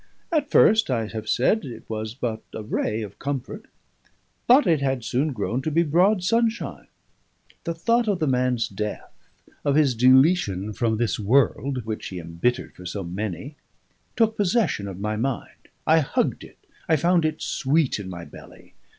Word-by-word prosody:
At 315 -3 +1
first, 220 -4 +5
I 115 -4 0
have 110 -1 -6
said, 205 - +2
it 120 - -9
was 110 0 -4
but 115 -4 -3
a 110 - -5
ray 110 +1 -2
of 100 -2 -10
comfort; 140 - -4 0.8
but 260 +4 +6
it 160 -4 +2
had 135 -3 -1
soon 140 +7 0
grown 120 +1 -2
to 155 - -2
be 165 +3 +2
broad 180 +5 +3
sunshine. 230 +3 0 0.8
The 170 -1 -2
thought 230 +8 +1
of 205 -3 +1
the 160 - 0
man's 125 -3 +1
death, 105 +1 -5 0.5
of 140 -1 +1
his 145 -4 +4
deletion 125 - +3
from 110 +2 0
this 115 0 -1
world, 125 +2 +1
which 110 -1 -4
he 95 - -7
embittered 85 +10 -2
for 90 - -13
so 95 +2 -4
many, 95 - -5 0.6
took 225 -1 +2
possession 195 - +1
of 95 -2 -7
my 105 +1 -2
mind. 130 +2 -4 0.2
I 160 +1 +5
hugged 145 - -1
it, - - -14 0.3
I 160 - +5
found 170 +3 +2
it 155 0 -1
sweet 140 -2 +1
in 95 -2 -6
my 85 -2 -7
belly. - - -15
130 Hz, 170 wpm, -24 LUFS, 110-165 Hz, 0.8 s, but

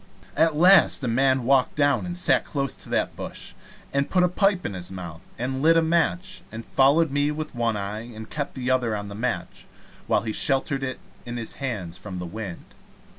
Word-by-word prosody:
At 160 +1 +3
last 180 -2 +6
a - - 0
man 130 +2 +2
walked 130 +1 +3
down 145 +1 +2
and 175 0 -3
sat 180 - +3
down - - -17
close 140 -3 -1
to - - -8
that - - 0
bush, - - -7 0.4
and 140 0 0
put 180 -1 +3
a - - +5
pipe 195 +1 +1
in 100 - -3
his 90 -1 -5
mouth, 85 -3 -8 0.2
and 130 +2 -3
lit 165 +2 +5
a 165 - +4
match, 170 +3 0
and 115 +1 -7
followed 145 +3 +3
me 145 +1 +1
with 155 +1 -4
one 115 -3 0
eye 105 +4 -5
and 110 0 -8
kept 145 -2 -4
the 130 -1 -1
other 120 -4 +1
on 100 -1 -5
the - - -7
match, 120 +5 -4 0.4
while - - +2
he 110 -2 -3
sheltered 135 +1 +1
it 130 -1 -4 0.2
in 120 0 -6
his 115 -2 -5
hands 100 -11 -4
from 95 -2 -7
the 90 - -5
wind. 95 -1 -7
130 Hz, 215 wpm, -24 LUFS, 110-155 Hz, 0.4 s, last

